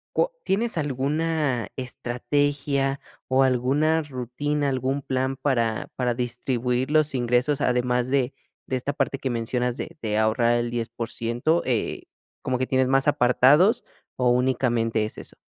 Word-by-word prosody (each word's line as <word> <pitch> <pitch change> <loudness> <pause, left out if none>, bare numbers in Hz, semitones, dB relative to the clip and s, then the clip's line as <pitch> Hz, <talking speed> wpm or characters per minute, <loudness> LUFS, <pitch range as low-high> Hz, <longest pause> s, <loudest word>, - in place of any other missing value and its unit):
¿Cua - - +2
tienes 220 0 0
alguna 145 -3 0
estrategia 135 +2 -1 0.3
o 130 +1 +3
alguna 140 +6 +2
rutina, 145 +2 -2
algún 135 +2 -1
plan 130 0 -1
para 120 -5 0
para 125 -2 +1
distribuir 125 +1 -1
los 155 -2 +2
ingresos, 125 +3 +1
además 125 0 +1
de 135 -1 +1 0.3
de 130 - -1
esta 140 +3 -2
parte 135 -1 -1
que 130 - -2
mencionas 120 +1 -1
de - - -7
de 105 -2 -1
ahorrar 115 +2 +3
el 120 0 0
10%, 120 +5 -1
eh, 120 -4 -1 0.4
como 130 -1 -1
que 130 - 0
tienes 130 -1 +2
más 135 +2 +3
apartados 145 - +4 0.3
o 125 -1 +2
únicamente 120 -3 +1
es 110 - -5
eso? - - -9
130 Hz, 140 wpm, -24 LUFS, 120-140 Hz, 0.4 s, apartados